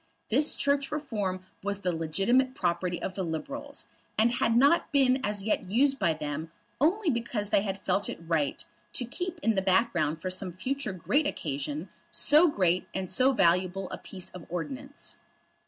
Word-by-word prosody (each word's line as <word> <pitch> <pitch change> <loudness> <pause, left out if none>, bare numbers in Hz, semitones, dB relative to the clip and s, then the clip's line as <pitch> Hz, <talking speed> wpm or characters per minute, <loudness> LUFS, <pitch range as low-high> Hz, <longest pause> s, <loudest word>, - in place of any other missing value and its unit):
This 285 +6 +3
Church 280 -1 +1
Reform 210 -11 -3 0.2
was 200 0 -3
the 180 - 0
legitimate 195 +12 +2
property 175 -2 -1
of 185 - -4
the 190 - -3
Liberals, 280 - -5 0.3
and 225 +2 +4
had 230 -1 +2
not 285 +7 +4
been 265 -2 +3
as 205 -1 -2
yet 205 -3 -1
used 270 +6 +3
by 170 - +3
them 155 +1 -5 0.3
only 340 - +3
because 230 -4 -2
they - - +4
had 195 -1 -4
felt 200 - +1
it - - -5
right 145 -8 0 0.3
to 250 - -1
keep 355 +8 -4
in 225 - +3
the 190 - +1
background 185 -5 +2
for 185 +2 -3
some 185 -1 -2
future 255 +5 -2
great 285 - +1
occasion 145 - -3 0.2
so 305 +4 +5
great 185 - +1
and 190 -1 -3
so 260 +2 +4
valuable 185 -2 +2
a - - -5
piece 185 -2 -8
of 180 -3 -10
ordnance. 270 +11 -6
200 Hz, 170 wpm, -29 LUFS, 180-270 Hz, 0.3 s, so